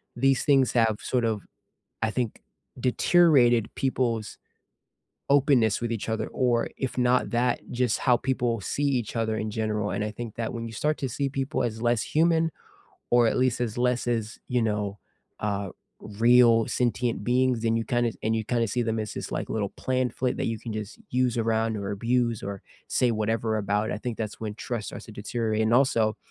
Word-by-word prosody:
These 135 +1 +2
things 135 -3 +4
have 115 -3 +3
sort 125 -2 0
of, 110 -3 -1 0.6
I 110 - +1
think, 120 -2 -3 0.4
deteriorated 125 -4 +4
people's 120 -5 -1 0.9
openness 135 -6 +4
with 120 -1 -2
each 115 0 -3
other 110 -1 -1
or 120 -2 +1
if 130 -1 -4
not 125 0 +2
that, 120 +1 +1
just 125 -2 0
how 125 -3 +3
people 120 -3 -1
see 145 - -2
each 125 -6 0
other 110 -1 0
in 110 - -2
general, 105 -1 -1
and 105 - -1
I 105 - -3
think 115 -1 -7
that 115 0 -3
when 115 0 -4
you 115 - -9
start 150 +7 0
to 135 - -2
see 140 +3 -1
people 135 0 -2
as 110 -1 -3
less 120 -2 +2
human 165 0 +2 0.6
or 120 -1 +5
at - - +1
least 125 -2 +2
as 120 -1 -2
less 125 0 +1
as 115 -2 -2
you 125 -1 +1
know, 105 -2 -1 0.4
uh, 100 -2 -2 0.3
real 115 +1 +4
sentient 120 -3 0
beings, 125 -1 +2
then 115 0 +2
you 115 - -1
kinda 120 -3 0
and 110 +1 +1
you 110 - -2
kinda 115 -1 0
see 120 +3 0
them 115 -1 -1
as 105 - -5
this, - - -6
like, - - -3
little 105 -3 -1
plan 130 -1 -1
flip 125 -1 -1
that - - -2
you 115 -1 -1
can 115 0 -6
just 110 +1 -6
use 125 -1 +1
around 110 -1 +1
or 100 0 -4
abuse 115 +2 0
or 100 -1 -5 0.3
say 125 -2 +2
whatever 110 0 0
about, 105 +1 0
I 105 - -3
think 120 0 -4
that's 110 -2 -4
when 105 -2 -4
trust 115 -1 -4
starts - - -8
to 110 - -11
deteriorate 110 +1 -1
and 110 +1 +1
also, 115 -5 +3
115 Hz, 195 wpm, -26 LUFS, 110-125 Hz, 0.9 s, or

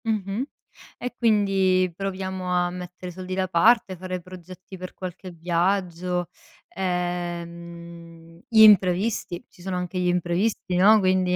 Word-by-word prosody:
Mh-mh 215 +2 -1 0.5
e 250 - -5
quindi 195 -5 +2
proviamo 190 -1 -4
a 180 0 +1
mettere 180 0 -8
soldi 185 +1 -6
da 190 0 0
parte, 190 +2 +4
fare 185 0 -5
progetti 185 +1 -11
per 185 0 -8
qualche 185 0 -7
viaggio, 175 +1 -1 0.4
ehm, 170 -2 -5
gli 220 -1 +5
imprevisti, 190 -2 +4
ci - - -19
sono 190 0 -3
anche 180 +1 -3
gli 180 - +1
imprevisti, 180 +2 0
no, 210 +4 +7
quindi, 185 -2 +2
185 Hz, 125 wpm, -24 LUFS, 175-190 Hz, 0.5 s, no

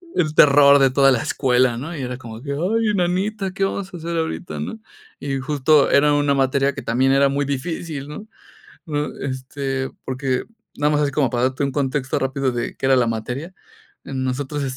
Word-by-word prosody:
El 155 -4 0
terror 140 0 +7
de 135 -1 +4
toda 135 0 +5
la 120 - +2
escuela, 125 -3 +1
¿no? 165 +7 -6
Y 140 - -5
era 125 -1 -4
como 115 -2 -10
que: 140 0 -5
"Ay, 210 +10 0
en 200 - -1
nanita, 190 +3 -1
¿qué 195 - -2
vamos 195 -1 -4
a - - -6
hacer 170 +1 -4
ahorita?" 160 +2 -3
¿No? 225 - -5 0.4
Y 135 -1 -3
justo 145 +1 +3
era 145 +1 +4
una 145 -1 +2
materia 135 0 +1
que 135 - -7
también 130 +4 +1
era 140 0 +4
muy 140 +1 -1
difícil, 145 +1 -4
¿no? 205 +9 -8 0.9
Este, 135 0 -3 0.2
porque 130 -1 -2 0.3
nada 150 +1 +2
más 150 - +2
es 140 - 0
como 135 -3 +1
para 120 +1 -1
darte 130 +2 -1
un 140 - 0
contexto 135 -1 -1
rápido 135 0 -1
de 120 0 -4
qué - - -3
era 135 -1 +5
la 120 -2 +2
materia. 125 +10 -4 0.5
Nosotros 135 +2 -3
140 Hz, 195 wpm, -21 LUFS, 130-150 Hz, 0.9 s, terror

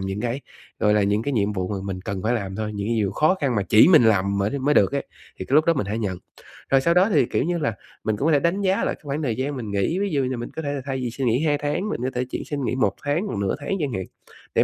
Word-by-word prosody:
những 95 +2 -3
cái, 120 +3 -2 0.4
gọi 105 0 +3
là, 105 - +3
những 105 +2 +1
cái 145 - -2
nhiệm 105 -3 +1
vụ 95 -2 -2
mà 100 - -2
mình 95 -2 -4
cần 95 0 -4
phải 115 +3 +1
làm 95 -3 -3
thôi, 105 -1 -3
những 100 0 -3
cái 115 - +1
nhiều 105 -3 0
khó 155 - +3
khăn 135 -4 +1
mà 100 - +2
chỉ 105 - +6
mình 155 -10 +7
làm 100 -2 +2
mới 105 +8 0
mới 145 +3 +1
được 95 -4 +4
ấy, - - -2 0.3
thì 95 - -4
cái 135 - -1
lúc 155 +1 +6
đó 170 - +3
mình 120 -8 -1
hãy 105 +3 -2
nhận. 95 -5 -2 0.5
Rồi 135 0 +4
sau 170 +4 +3
đó 185 +4 +4
thì, 140 -5 +4
kiểu - - 0
như 175 +2 -1
là, 145 -9 -1 0.3
mình 110 -1 -1
cũng 135 - -1
có - - +4
thể 145 - +5
đánh 175 +6 0
giá 190 -1 +2
lại - - -1
cái - - -29
khoảng 145 +2 -2
thời 115 -5 0
gian 140 +2 -2
mình 110 -5 -5
nghỉ, 100 - 0
ví 200 0 0
dụ 140 -3 +1
như 130 -1 -2
mình 120 - -5
có 160 - -3
thể 145 -1 -3
là 140 - -3
thay 135 -1 -2
vì 120 - -2
xin 130 +1 -2
nghỉ 125 +7 +2
2 145 -1 +2
tháng, 150 +9 -2
mình 120 - -3
có 130 - 0
thể 125 - 0
chỉ - - -4
xin 145 -2 -4
nghỉ 120 - -1
1 105 -7 +1
tháng 150 +8 0
hoặc 105 - -4
nửa 100 -1 0
tháng 145 +7 -3
chẳng 135 -5 -2
hạn, 95 -1 -3 0.5
để - - +5
125 Hz, 330 wpm, -23 LUFS, 100-145 Hz, 0.5 s, mình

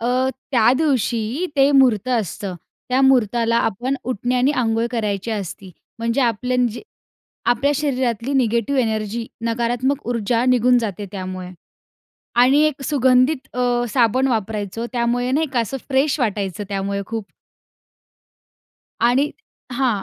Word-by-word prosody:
अ, 250 +3 +1 0.2
त्या 235 -1 +5
दिवशी 255 - 0
ते 275 +1 +5
मुहूर्त 255 -5 +4
असतं. 205 -5 -2 0.3
त्या 255 +1 +2
मुहूर्ताला 235 -3 +3
आपण 240 +6 -1
उटण्याने 250 +2 0
अंघोळ 225 0 +1
करायची 210 -2 -2
असती. 195 -2 -5 0.3
म्हणजे 230 +3 0
आपले 250 +1 0 0.2
जे - - -8 0.7
आपल्या 250 +4 +2
शरीरातली 260 -4 -1
निगेटिव्ह 240 +1 +1
एनर्जी 220 0 -2 0.2
नकारात्मक 240 +4 -1
ऊर्जा 235 0 0
निघून 250 0 +4
जाते 205 -3 -4
त्यामुळे 185 -2 -6 0.9
आणि 270 +4 +5
एक 285 -2 -3
सुगंधित 260 0 +2
अ, 245 -1 +1
साबण 250 +2 +2
वापरायचो 220 -1 -2
त्यामुळे 245 +1 0
नाही 305 +4 +1
का? 245 - +2
असं 230 +4 -3
फ्रेश 275 +2 +2
वाटायचं 205 -4 -2
त्यामुळे 200 0 -2
खूप. 225 0 -4 1.8
आणि 255 +5 +3 0.4
हां. 240 -5 0
240 Hz, 125 wpm, -20 LUFS, 220-260 Hz, 1.8 s, त्या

